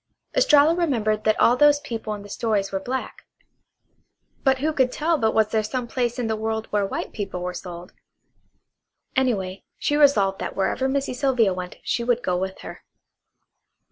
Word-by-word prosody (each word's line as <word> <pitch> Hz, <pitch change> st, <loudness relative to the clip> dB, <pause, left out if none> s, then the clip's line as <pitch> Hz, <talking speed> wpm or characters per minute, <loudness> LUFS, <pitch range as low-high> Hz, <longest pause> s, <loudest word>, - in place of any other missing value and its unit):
Estralla 320 Hz, -11 st, +5 dB
remembered 230 Hz, -11 st, 0 dB
that 215 Hz, 0 st, +2 dB
all 240 Hz, -, +5 dB
those 290 Hz, +1 st, +5 dB
people 230 Hz, -7 st, -5 dB
in 205 Hz, -, -9 dB
the -, -, -11 dB
stories 210 Hz, -3 st, -1 dB
were 195 Hz, -, -1 dB
black; 255 Hz, +6 st, -5 dB, 1.2 s
but 265 Hz, -1 st, +3 dB
who 305 Hz, +4 st, -1 dB
could 260 Hz, -4 st, +2 dB
tell 330 Hz, +5 st, +1 dB
but 225 Hz, -7 st, +1 dB
what 220 Hz, -1 st, +2 dB
there 220 Hz, -, +2 dB
was 215 Hz, 0 st, -3 dB
some 255 Hz, 0 st, -2 dB
place 240 Hz, -1 st, -1 dB
in 245 Hz, -, -1 dB
the 220 Hz, 0 st, 0 dB
world 220 Hz, 0 st, -2 dB
where 205 Hz, -1 st, +1 dB
white -, -, -5 dB
people 195 Hz, -3 st, -4 dB
were 180 Hz, 0 st, -3 dB
sold? 175 Hz, -1 st, -8 dB, 1.2 s
Anyway, 200 Hz, -8 st, 0 dB
she 290 Hz, -, 0 dB
resolved 210 Hz, -10 st, +4 dB
that -, -, -4 dB
wherever 255 Hz, +7 st, 0 dB
Missy 275 Hz, -1 st, -1 dB
Sylvia 250 Hz, -7 st, +2 dB
went 180 Hz, 0 st, -6 dB
she 235 Hz, -, -1 dB
would 245 Hz, 0 st, 0 dB
go 180 Hz, -, 0 dB
with 190 Hz, +1 st, -3 dB
her. -, -, -9 dB
225 Hz, 180 wpm, -23 LUFS, 200-265 Hz, 1.2 s, Estralla